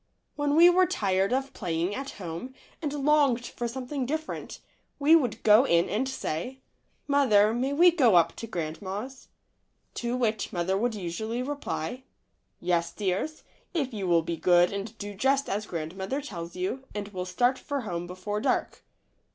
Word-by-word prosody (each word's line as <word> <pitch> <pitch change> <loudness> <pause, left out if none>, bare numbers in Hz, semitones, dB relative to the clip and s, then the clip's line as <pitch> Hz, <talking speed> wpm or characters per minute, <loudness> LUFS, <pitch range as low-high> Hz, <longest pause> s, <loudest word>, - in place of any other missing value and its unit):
When 290 0 0
we 335 +2 +8
were 365 +1 +5
tired 195 - +1
of 270 +1 -1
playing 175 0 -2
at 270 +3 -5
home 185 +8 -6 0.3
and 300 -3 -2
longed 280 -4 +2
for 240 - -4
something 255 +2 -4
different, 315 +3 -4 0.4
we 295 +3 +6
would 250 -9 +1
go 215 +3 +7
in 170 -10 +2
and 255 +6 0
say, 250 -3 -3
f? 265 - -26 0.5
Mother, 225 -7 +4
may 255 +4 0
we 345 +5 +6
go 255 - +4
up 170 -1 +4
to 230 - -6
grand 165 -6 -4
ma's?" 210 +8 -6 0.7
To 240 +1 -2
which 220 -4 -1
mother 180 +2 0
would 230 +3 0
usually 220 +6 -3
reply, 255 - -4 0.6
"Yes, 170 -1 0
dears, 205 +10 -2 0.3
if 275 -6 -1
you 200 -3 -3
will 170 -2 +3
be 170 0 -3
good 175 +2 +4
and 205 +3 -5
do 205 -1 -6
just 270 +7 +1
as 205 +1 -2
grandmother 190 - -4
tells 170 - -7
you, 190 +9 -3
and 205 -1 -4
will 185 -3 -5
start 245 +8 +1
for 285 -2 -3
home 175 -6 -4
before 195 +4 -4
dark." - - -1
220 Hz, 170 wpm, -27 LUFS, 185-270 Hz, 0.7 s, we